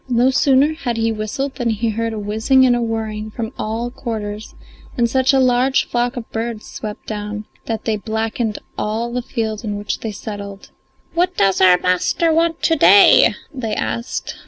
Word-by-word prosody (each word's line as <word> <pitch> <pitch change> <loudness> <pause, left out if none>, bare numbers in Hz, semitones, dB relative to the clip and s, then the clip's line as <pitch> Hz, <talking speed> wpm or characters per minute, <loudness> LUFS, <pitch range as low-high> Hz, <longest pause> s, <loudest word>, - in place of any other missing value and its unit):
[Illustration: 240 - 0
No 260 - +4
sooner 275 +2 +3
had 240 -4 -2
he 225 0 +1
whistled 225 +6 -3
than 240 -2 0
he 225 +1 0
heard 230 +1 -2
a 220 - -5
whizzing 220 +6 +2
and 245 -1 +4
a 240 - -1
whirring 220 -2 -3
from 225 +2 -5
all 230 +3 -3
quarters, 215 -4 -6 0.4
and 240 -1 +3
such 260 +3 +2
a 270 - +3
large 255 +1 +3
flock 245 +1 -1
of 230 - -5
birds 225 -1 -4
swept 210 -1 -7
down 210 0 -5 0.2
that 225 -1 -3
they 220 -2 0
blackened 220 +1 -2 0.2
all 230 +3 -2
the 250 - -1
field 220 -2 -3
in 205 -2 -3
which 205 0 -3
they 220 - -4
settled.] 200 -1 -8 0.4
"What 355 +2 0
does 195 -1 +2
our 180 -1 +7
master 180 - +1
want 330 0 +1
to 325 - +3
day?" 200 - +6 0.2
they 225 -6 -3
asked. 115 +1 -3
225 Hz, 185 wpm, -19 LUFS, 210-250 Hz, 0.4 s, our